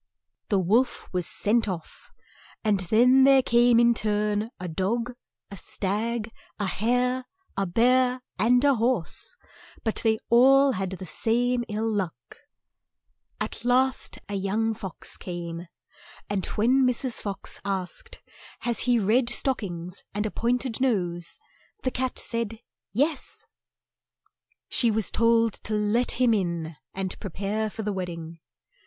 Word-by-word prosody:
The 200 - +3
wolf 215 +8 +1
was 180 -2 0
sent 225 +2 +2
off, 170 -4 -7 0.5
and 210 -3 +2
then 240 +8 +5
there 270 -1 +6
came 240 0 +5
in 235 0 +5
turn, 210 -1 0
a 180 - -4
dog, 225 +9 -1 0.4
a 200 - -7
stag, 215 +5 -2 0.3
a 205 - -1
hare, 250 +6 0 0.3
a 195 0 0
bear, 250 +5 +3 0.2
and 245 +4 +4
a 285 -1 +5
horse, 230 -7 0 0.5
but 220 - -1
they 220 -1 +2
all 270 +3 +6
had 190 -5 -2
the 190 0 -7
same 240 +8 +1
ill 215 +2 -1
luck. 200 -6 -1 1.2
96 - - -4
CINDERELLA 245 +1 +3
At 260 +1 +6
last 265 - -5
a 205 - -6
young 205 +3 0
fox 190 -4 -6
came, 175 -1 -6 0.6
and 195 -3 -1
when 250 +5 +3
Mrs. 250 0 +1
Fox 200 -1 -5
asked, 200 - -4 0.4
"Has 240 -1 0
he 245 - +5
red 230 +4 +2
stock 260 +1 0
ings 175 -3 -6
and 210 +1 0
a 215 - -2
point 245 +2 0
ed 250 -1 -4
nose?" 175 -9 -1 0.4
the 255 - 0
cat 255 0 -2
said, 230 -1 -2 0.3
"Yes." 285 +5 -1 1.2
She 235 - +3
was 220 -1 0
told 230 -1 +3
to 215 - -1
let 210 +4 +2
him 245 -2 +3
in 170 -5 -2 0.2
and 190 -1 -4
pre 200 - -5
pare 205 +4 -2
for 220 +1 -6
the 210 0 -1
wed 185 -2 -3
ding. 165 -1 -8
220 Hz, 150 wpm, -26 LUFS, 195-245 Hz, 1.2 s, there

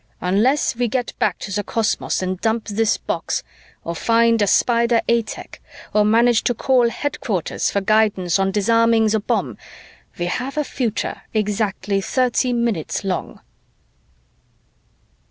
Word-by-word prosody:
Unless 225 +9 +1
we 245 0 +1
get 245 +2 -2
back - - +1
to 200 - -7
the 205 +2 -1
cosmos 220 -3 -1
and 185 0 -3
dump 225 0 0
this 220 +1 +1
box, - - -3 0.4
or 170 - -4
find 230 +2 +3
a 205 - +3
Spider 235 +2 +3
A 235 0 +3
tech, 220 - -10 0.3
or 210 - +4
manage 230 +2 +3
to 245 - +1
call 245 0 +3
headquarters 230 - -2
for 200 - -1
guidance 200 -3 +2
on 195 0 +2
disarming 230 +2 +3
the 220 +1 +1
bomb, 205 - -2 0.6
we 175 - -2
have 255 +11 -3
a 300 - +2
future 240 -6 -3
exactly 205 -1 -1
thirty 250 +3 +1
minutes 235 -8 -1
long." 190 -2 -4
225 Hz, 140 wpm, -20 LUFS, 200-235 Hz, 0.6 s, or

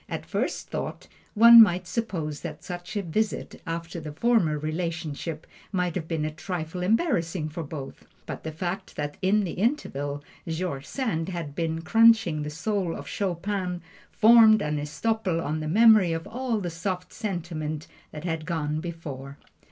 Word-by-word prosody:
At - - -4
first - - -2
thought, - - -4 0.3
one 230 +2 +10
might 185 -4 +4
suppose 165 -6 -3
that 155 -3 -7
such 175 +3 -6
a 200 - -1
visit, 210 +5 -2
after 165 +1 -4
the 155 -1 -7
former 170 -3 +2
relationship, 160 0 -4 0.3
might 180 -3 0
have 160 -3 -4
been 160 -2 -1
a 155 - -2
trifle 175 +1 -5
embarrassing 180 - +1
for 165 +3 -5
both. 145 -3 -8 0.2
But - - -6
the 160 - -4
fact 175 +4 -4
that 145 0 -4
in 205 +3 +3
the 180 - -3
interval 145 - -1 0.2
George 160 -4 -3
Sand 195 -11 -2
had 170 -6 -5
been 165 0 -2
crunching 210 -4 +5
the 150 - -3
soul 180 +2 -2
of - - -8
Chopin 185 -1 -2 0.3
formed 220 -1 +7
an 150 0 -1
estoppel 185 +4 -1
on 155 -1 -2
the 155 - -4
memory 210 -1 +6
of 165 0 -4
all 245 -1 -2
the 175 -2 -3
soft 180 +2 -4
sentiment 160 -6 -4 0.2
that 150 - -8
had 165 -2 -3
gone 155 -3 -1
before. 145 -5 -7
170 Hz, 160 wpm, -26 LUFS, 155-200 Hz, 0.3 s, one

